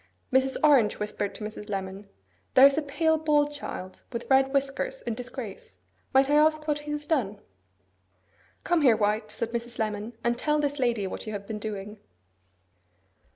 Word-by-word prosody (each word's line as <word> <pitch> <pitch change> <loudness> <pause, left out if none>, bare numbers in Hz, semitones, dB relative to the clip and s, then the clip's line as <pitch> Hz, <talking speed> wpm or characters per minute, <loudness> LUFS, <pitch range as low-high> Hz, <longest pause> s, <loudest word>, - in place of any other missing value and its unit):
Mrs. 265 0 +3
Orange 270 -9 +5
whispered 210 -1 -3
to - - -7
Mrs. 210 0 -7
Lemon, 195 0 -5 0.5
'There 260 - +9
is 280 0 +6
a 310 - +1
pale, 320 +2 +1
bald 295 -1 +2
child, 185 -10 -6
with 235 -1 -5
red 265 0 +5
whiskers, 270 -1 -1
in 235 - -2
disgrace. 230 - -8 0.3
Might 270 0 +5
I 290 - +1
ask 310 0 +3
what 295 -1 +1
he 295 0 -7
has 295 0 -4
done?' 230 -11 0 1.2
'Come 345 -2 +2
here, 245 -6 +5
White,' 210 +1 0
said 230 +2 -4
Mrs. 235 0 -4
Lemon, 215 0 -3
'and 240 0 0
tell 300 0 +1
this 290 -1 -1
lady 235 -5 +1
what 190 - -6
you 215 - -4
have 200 -1 -5
been 215 0 -5
doing. 210 0 -6
245 Hz, 175 wpm, -27 LUFS, 210-290 Hz, 1.2 s, There